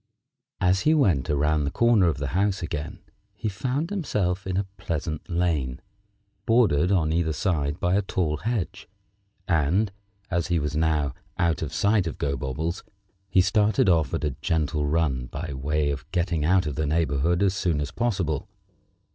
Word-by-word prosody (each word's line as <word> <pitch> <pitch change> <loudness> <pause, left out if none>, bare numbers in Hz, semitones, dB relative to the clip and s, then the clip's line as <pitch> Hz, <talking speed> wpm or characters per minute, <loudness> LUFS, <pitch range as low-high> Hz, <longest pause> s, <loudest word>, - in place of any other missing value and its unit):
As 90 +1 +3
he 155 +1 +4
went 90 - +2
around 75 +1 +2
the 70 - 0
corner 115 -1 +4
of 80 - 0
the 70 0 -3
house 95 +3 0
again 75 -2 -5 0.3
he - - -4
found 130 - -2
himself 100 - -1
in 95 -1 -1
a 100 - 0
pleasant 80 0 -4
lane, 80 -8 0 0.7
bordered 100 -8 +4
on 80 -5 +2
either 80 -1 +1
side 75 -4 -1
by 90 - +1
a 100 - +3
tall 85 -5 -1
hedge, 95 -4 -3 0.6
and, 90 +4 +2 0.4
as 85 -1 0
he 85 - +1
was 75 0 -2
now 75 -3 +1 0.2
out 85 -4 +1
of 75 -3 -3
sight 100 -1 +2
of 80 - -5
Gobobbles, 70 +5 -2 0.5
he 95 - +4
started 105 +1 +3
off 80 -6 +3
on - - -2
a 75 - +1
gentle 75 -2 0
run 70 -5 0
by 75 +4 -5
way 75 +2 0
of 70 +1 -6
getting 85 -3 0
out 90 +3 +3
of 75 - -2
the 75 +2 -1
neighborhood 80 +3 +1
as 95 -2 +3
soon 85 -6 0
as 75 0 -3
possible. 90 - -1
85 Hz, 170 wpm, -25 LUFS, 75-95 Hz, 0.7 s, he